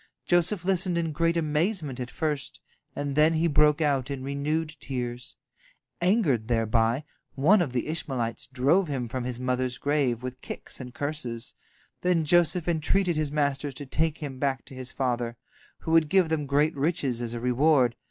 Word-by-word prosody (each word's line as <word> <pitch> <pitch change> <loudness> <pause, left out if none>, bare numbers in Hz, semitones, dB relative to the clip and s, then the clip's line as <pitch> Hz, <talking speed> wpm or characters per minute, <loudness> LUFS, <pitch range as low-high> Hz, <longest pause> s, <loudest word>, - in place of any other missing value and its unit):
Joseph 175 +1 +2
listened 185 -2 +1
in 165 -2 0
great 165 +2 +1
amazement 155 - 0
at 125 0 -4
first, 150 -3 -3 0.4
and 145 -1 -3
then 155 +2 +5
he 160 +1 +1
broke 150 -1 +4
out 140 -3 +1
in 135 -2 -4
renewed 150 +3 -2
tears. 125 -2 -5 0.7
Angered 175 - +2
thereby, 115 +2 +1 0.3
one 180 +9 +5
of 155 -7 -1
the 125 -2 -1
Ishmaelites 130 -7 -3
drove 140 +8 +2
him 130 -5 -2
from 125 +1 -4
his 125 -1 -4
mother's 125 0 -1
grave 140 -5 0
with 130 0 -6
kicks - - -7
and 125 -2 -7
curses. 130 -5 -4 0.5
Then 175 -3 +2
Joseph 175 +1 +3
entreated 175 +2 +1
his 155 -2 -1
masters 145 -2 -1
to 145 - -6
take 160 +3 0
him 135 -4 -6
back 135 -4 -1
to - - -12
his 130 0 -6
father, 120 -3 -2 0.4
who 160 - -4
would 165 -2 +4
give 185 -2 +4
them 155 -3 -1
great 145 +3 +2
riches 140 -5 0
as 120 0 -4
a - - -3
reward. 125 0 +3
145 Hz, 170 wpm, -27 LUFS, 125-160 Hz, 0.7 s, then